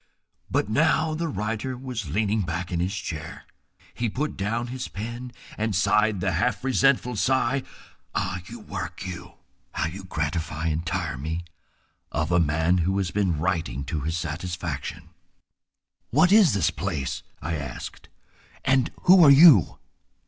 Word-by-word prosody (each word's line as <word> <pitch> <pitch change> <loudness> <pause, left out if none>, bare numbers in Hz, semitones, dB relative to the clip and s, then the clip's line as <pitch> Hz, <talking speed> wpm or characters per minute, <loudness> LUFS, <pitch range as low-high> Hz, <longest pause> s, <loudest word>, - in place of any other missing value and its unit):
But - - +1
now 155 +8 +2
the 165 +2 -2
writer 110 +2 -3
was 125 - -5
leaning 105 +5 +1
back 85 0 -3
in 85 - -1
his 95 +4 -1
chair. 80 -4 -6 0.5
He 120 -1 -1
put 150 +8 -3
down 110 +4 -1
his 130 0 -4
pen 120 +4 -6 0.3
and 110 -2 0
sighed 105 +1 +2
the 95 0 +1
half 85 +8 0
resentful 130 -2 +2
sigh—"ah! 120 -6 -2
you, - - -9
work, - - -6
you! 90 -2 -7 0.4
how - - -1
you 95 +4 -6
gratify 80 -1 -2
and 80 +1 -1
tire 85 -5 -3
me!"—of 80 0 -6
a 90 - +4
man 80 +3 +2
who 95 +3 +1
has 95 -3 -1
been 95 -6 +1
writing 80 -6 -1
to 70 +3 -3
his 80 +4 -2
satisfaction. 80 -2 -5 1.0
"What 160 +8 +4
is 200 - +6
this 95 - +2
place," 65 - -3 0.2
I 80 +4 -3
asked, 70 -6 -6 0.6
"and 130 -1 +3
who 185 -1 +8
are 145 - +8
you?" 140 - +7
95 Hz, 145 wpm, -25 LUFS, 80-120 Hz, 1.0 s, who